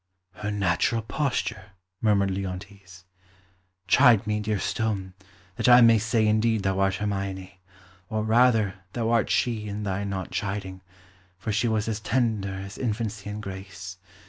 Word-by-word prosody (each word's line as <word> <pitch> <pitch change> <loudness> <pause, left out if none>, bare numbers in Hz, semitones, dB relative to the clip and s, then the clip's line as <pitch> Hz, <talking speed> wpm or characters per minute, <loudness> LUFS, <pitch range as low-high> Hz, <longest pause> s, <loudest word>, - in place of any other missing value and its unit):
"Her 105 +3 -5
natural 105 +3 +1
posture!" 110 -6 -2 0.3
murmured 100 -3 +2
Leontes. 95 -1 -7 0.8
"Chide 115 +1 +5
me, 105 0 0
dear 105 0 -1
stone, 100 -2 -2 0.4
that - - +2
I 120 0 +9
may 115 -1 +6
say 110 +1 +1
indeed 110 0 +2
thou 95 0 0
art 95 -1 +2
Hermione; 95 -2 -4 0.5
or, 110 -1 -1
rather, 110 -4 +3
thou 115 -1 -1
art 115 -2 +2
she 110 -3 0
in 105 +1 -4
thy 100 0 -2
not 100 -2 -4
chiding, 95 -2 -4 0.6
for 105 +3 -4
she 110 +3 +1
was 110 -1 0
as 110 -2 -2
tender 110 -3 0
as 95 +1 -8
infancy 110 -3 -3
and 105 +1 -6
grace. 95 -2 -8
105 Hz, 145 wpm, -26 LUFS, 95-110 Hz, 0.8 s, I